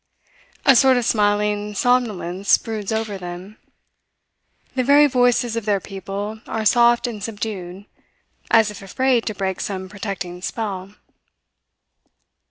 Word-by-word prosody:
A 275 Hz, -, +7 dB
sort 260 Hz, +1 st, +5 dB
of 245 Hz, -, 0 dB
smiling 210 Hz, -1 st, +1 dB
somnolence 205 Hz, -6 st, +2 dB
broods 215 Hz, -3 st, -5 dB
over 220 Hz, -3 st, -2 dB
them; 180 Hz, +3 st, -8 dB, 1.2 s
the 255 Hz, -, 0 dB
very 285 Hz, +3 st, +6 dB
voices 245 Hz, -3 st, +2 dB
of 230 Hz, -2 st, -3 dB
their 205 Hz, -2 st, +1 dB
people 200 Hz, +3 st, -6 dB
are 220 Hz, -1 st, -3 dB
soft 240 Hz, +2 st, +4 dB
and 220 Hz, -5 st, -5 dB
subdued, 200 Hz, -4 st, -5 dB, 0.6 s
as 220 Hz, -2 st, +4 dB
if 205 Hz, -, -11 dB
afraid 245 Hz, +5 st, 0 dB
to 215 Hz, -, -2 dB
break 190 Hz, -1 st, -2 dB
some 190 Hz, -2 st, -4 dB
protecting 190 Hz, -3 st, -6 dB
spell. 200 Hz, -2 st, -5 dB
210 Hz, 125 wpm, -21 LUFS, 195-235 Hz, 1.2 s, A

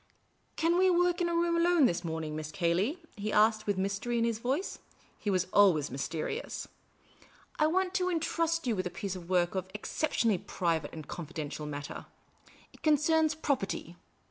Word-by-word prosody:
" -, -, -41 dB
Can 340 Hz, +2 st, +3 dB
we 375 Hz, 0 st, +5 dB
work 355 Hz, 0 st, +2 dB
in 345 Hz, -, +2 dB
a 340 Hz, -, 0 dB
room 340 Hz, 0 st, +2 dB
alone 340 Hz, -3 st, +4 dB
this 175 Hz, -6 st, +1 dB
morning. 160 Hz, -2 st, -3 dB
Miss 155 Hz, 0 st, -5 dB
Cayley? 190 Hz, -, +1 dB
" -, -, -31 dB
he 210 Hz, +1 st, -3 dB
asked, 215 Hz, 0 st, +3 dB
with 205 Hz, -2 st, +1 dB
mystery 200 Hz, +5 st, -1 dB
in 230 Hz, -, +2 dB
his 230 Hz, -2 st, 0 dB
voice; 270 Hz, +11 st, -2 dB, 0.4 s
he 210 Hz, -, -2 dB
was 185 Hz, -2 st, +2 dB
always 180 Hz, -8 st, +5 dB
mysteri 160 Hz, -, -3 dB
ous. -, -, -6 dB, 0.5 s
" -, -, -27 dB
I 305 Hz, -, +5 dB
want 370 Hz, +3 st, +1 dB
to 365 Hz, -2 st, +1 dB
intrust 330 Hz, -1 st, 0 dB
you 235 Hz, -3 st, +1 dB
with 185 Hz, -2 st, -1 dB
a -, -, -4 dB
piece 190 Hz, +2 st, -4 dB
of 175 Hz, -1 st, -9 dB
work 175 Hz, -2 st, +2 dB
of 190 Hz, -2 st, -2 dB
an 190 Hz, -, -21 dB
ex 210 Hz, -, -6 dB
ceptionally 230 Hz, -, +1 dB
private 165 Hz, -4 st, -1 dB
and 155 Hz, -2 st, -8 dB
confidential 155 Hz, -3 st, -5 dB
character. 145 Hz, 0 st, -6 dB, 0.7 s
It -, -, -18 dB
concerns 310 Hz, +1 st, +3 dB
Property. 240 Hz, -, -2 dB
215 Hz, 195 wpm, -31 LUFS, -, 0.7 s, we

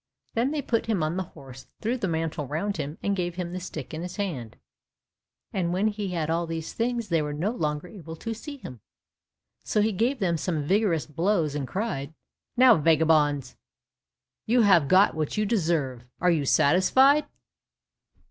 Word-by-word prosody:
Then 235 Hz, +4 st, +1 dB
they 295 Hz, -1 st, -2 dB
put 230 Hz, -2 st, 0 dB
him 205 Hz, -8 st, +1 dB
on 155 Hz, +2 st, -1 dB
the 190 Hz, -, -1 dB, 0.2 s
horse, 130 Hz, -2 st, -12 dB
threw 230 Hz, +3 st, -1 dB
the 230 Hz, -6 st, -2 dB
mantle 160 Hz, -3 st, -2 dB
round 175 Hz, +8 st, -2 dB
him, 150 Hz, 0 st, -4 dB
and 200 Hz, -, +1 dB
gave 175 Hz, -2 st, -2 dB
him 175 Hz, -1 st, -4 dB
the 185 Hz, -, -3 dB
stick 160 Hz, -5 st, -7 dB
in 155 Hz, -, -4 dB
his 180 Hz, +1 st, -6 dB
hand, 140 Hz, -, -4 dB, 1.0 s
and 175 Hz, -3 st, 0 dB
when 200 Hz, +4 st, +2 dB
he 205 Hz, -1 st, -4 dB
had 170 Hz, -4 st, -2 dB
all 165 Hz, +1 st, 0 dB
these 165 Hz, -1 st, -5 dB
things 235 Hz, -1 st, -2 dB
they 165 Hz, -2 st, +2 dB
were 150 Hz, -1 st, -3 dB
no 170 Hz, +9 st, -1 dB
longer 150 Hz, -7 st, -2 dB
able 165 Hz, -4 st, -9 dB
to 225 Hz, +7 st, -5 dB
see 285 Hz, +6 st, -8 dB
him. 125 Hz, -, -10 dB, 0.8 s
So -, -, 0 dB
he 215 Hz, +1 st, +3 dB
gave 235 Hz, +8 st, 0 dB
them 180 Hz, -6 st, 0 dB
some 155 Hz, -1 st, -2 dB
vigorous 185 Hz, -1 st, +1 dB
blows 165 Hz, 0 st, 0 dB
and 145 Hz, -3 st, -3 dB
cried, 160 Hz, -, -3 dB, 0.4 s
"Now, 250 Hz, -3 st, +7 dB
vagabonds, 150 Hz, -4 st, +2 dB, 0.9 s
you 240 Hz, +1 st, +4 dB
have 175 Hz, -8 st, +5 dB
got 190 Hz, +4 st, +5 dB
what 155 Hz, +4 st, -3 dB
you 215 Hz, -, +2 dB
deserve, 160 Hz, -, 0 dB, 0.2 s
are 180 Hz, 0 st, +3 dB
you 155 Hz, -4 st, +1 dB
satisfied?" 260 Hz, -, +4 dB
175 Hz, 180 wpm, -26 LUFS, 155-210 Hz, 1.0 s, Now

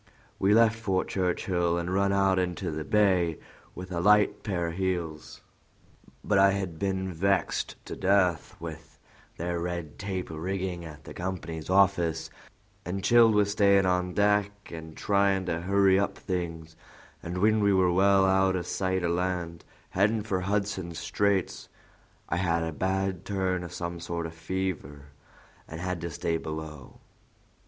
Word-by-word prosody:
"We 100 Hz, +2 st, +4 dB
left 115 Hz, -1 st, +4 dB
Fort 95 Hz, -4 st, -1 dB
Churchill 90 Hz, -2 st, 0 dB
and 85 Hz, +1 st, -2 dB
run 100 Hz, +1 st, +2 dB
out 95 Hz, -1 st, +3 dB
into 90 Hz, -1 st, -2 dB
the 80 Hz, 0 st, -4 dB
Bay 90 Hz, -5 st, +2 dB, 0.4 s
with 90 Hz, +1 st, -8 dB
a 85 Hz, -, -2 dB
light 105 Hz, +3 st, +4 dB
pair 90 Hz, -5 st, -2 dB
o' -, -, -4 dB
heels; 85 Hz, -4 st, -3 dB, 0.8 s
but 100 Hz, -2 st, +2 dB
I 100 Hz, 0 st, +6 dB
had 95 Hz, -5 st, -4 dB
been 95 Hz, -1 st, -2 dB
vexed 95 Hz, +2 st, 0 dB
to -, -, -6 dB
death 95 Hz, -3 st, +1 dB
with 80 Hz, -2 st, -9 dB, 0.4 s
their 85 Hz, +1 st, -2 dB
red 85 Hz, -3 st, -5 dB
tape 95 Hz, -2 st, -4 dB
rigging 90 Hz, +2 st, -3 dB
at 75 Hz, -1 st, -11 dB
the -, -, -10 dB
company's 85 Hz, -3 st, -5 dB
office, 90 Hz, -4 st, +2 dB, 0.5 s
and 95 Hz, +2 st, -4 dB
chilled 115 Hz, 0 st, +6 dB
with 100 Hz, -1 st, +3 dB
stayin' 100 Hz, -2 st, +4 dB
on 90 Hz, -1 st, 0 dB
deck 105 Hz, 0 st, +1 dB
an' 80 Hz, -1 st, -8 dB
tryin' 100 Hz, -2 st, +1 dB
to 85 Hz, -2 st, -1 dB
hurry 95 Hz, +1 st, +4 dB
up 100 Hz, -, -1 dB
things, 85 Hz, -4 st, -4 dB, 0.5 s
and 85 Hz, +1 st, -5 dB
when 110 Hz, +3 st, +3 dB
we 100 Hz, 0 st, +4 dB
were 95 Hz, -2 st, +3 dB
well 95 Hz, +1 st, +4 dB
out 95 Hz, 0 st, +3 dB
o' 90 Hz, -, -2 dB
sight 95 Hz, +1 st, -1 dB
o' -, -, +1 dB
land, 85 Hz, -1 st, -2 dB, 0.3 s
headin' 105 Hz, +3 st, +2 dB
for 95 Hz, -4 st, -1 dB
Hudson's 95 Hz, -3 st, -2 dB
Straits, 100 Hz, -2 st, -1 dB, 0.6 s
I 85 Hz, -, -1 dB
had 85 Hz, -2 st, +1 dB
a 80 Hz, -, -2 dB
bad 95 Hz, +1 st, -1 dB
turn 95 Hz, -2 st, -1 dB
o' -, -, -5 dB
some 85 Hz, +1 st, -5 dB
sort 85 Hz, 0 st, -4 dB
o' 80 Hz, -, -5 dB
fever, 80 Hz, -4 st, -4 dB, 0.6 s
and 80 Hz, -, -8 dB
had 90 Hz, -1 st, -3 dB
to 85 Hz, -, -3 dB
stay 80 Hz, +1 st, -1 dB
below. 80 Hz, -4 st, -8 dB
90 Hz, 160 wpm, -28 LUFS, 85-100 Hz, 0.8 s, I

